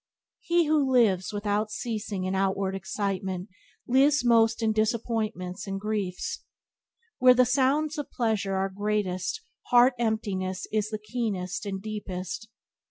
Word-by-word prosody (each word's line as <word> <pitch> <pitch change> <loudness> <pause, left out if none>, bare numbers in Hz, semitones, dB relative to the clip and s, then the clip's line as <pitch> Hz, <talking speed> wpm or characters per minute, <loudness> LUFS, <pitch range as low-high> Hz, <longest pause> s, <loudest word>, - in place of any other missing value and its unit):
He 345 -1 +2
who 295 -3 +2
lives, 210 -8 +3
without 205 +1 -1
ceasing 210 -3 -4
in 185 +1 -1
outward 195 0 0
excitement 190 0 -3 0.4
lives 275 +2 +4
most 230 -1 +4
in 220 -1 +2
disappointments 215 -4 -1
and 195 0 -3
griefs. 205 -3 -3 0.8
Where 255 0 +7
the 255 0 +5
sounds 290 +5 +1
of 290 - -5
pleasure 215 -5 -1
are 190 0 0
greatest 190 -2 -2 0.2
heart 245 +1 +6
emptiness 200 -5 -1
is 215 -1 +1
the 215 - -3
keenest 210 -4 -3
and 195 -1 -3
deepest. 205 0 -5
210 Hz, 130 wpm, -27 LUFS, 195-235 Hz, 0.8 s, Where